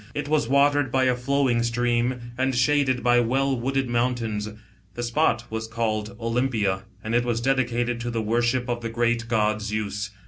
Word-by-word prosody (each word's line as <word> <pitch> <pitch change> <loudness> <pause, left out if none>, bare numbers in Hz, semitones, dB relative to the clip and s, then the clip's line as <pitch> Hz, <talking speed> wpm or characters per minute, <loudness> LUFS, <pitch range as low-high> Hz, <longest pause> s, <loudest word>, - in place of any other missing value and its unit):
It 145 -1 -3
was 150 -5 +1
watered 140 -1 +3
by 130 +1 +2
a 125 -1 +3
flowing 125 -1 +1
stream 120 +1 -1
and 130 +1 0
shaded 130 -1 +2
by 120 0 +4
well 135 +3 +1
wooded 135 +2 -1
mountains. 120 -3 -1 0.5
The 120 - -4
'spot 120 -1 +1
was 110 0 -3
called 110 -2 -2
Olympia, 115 -5 0 0.2
and 110 - -3
it 120 +1 +3
was 120 -2 -1
dedicated 120 -2 0
to 120 - -3
the 115 -1 -2
worship 120 +3 0
of 120 -1 -2
the 115 - -3
great 120 0 0
god 110 -2 +1
Zeus. 105 -1 -3
120 Hz, 175 wpm, -24 LUFS, 115-130 Hz, 0.5 s, by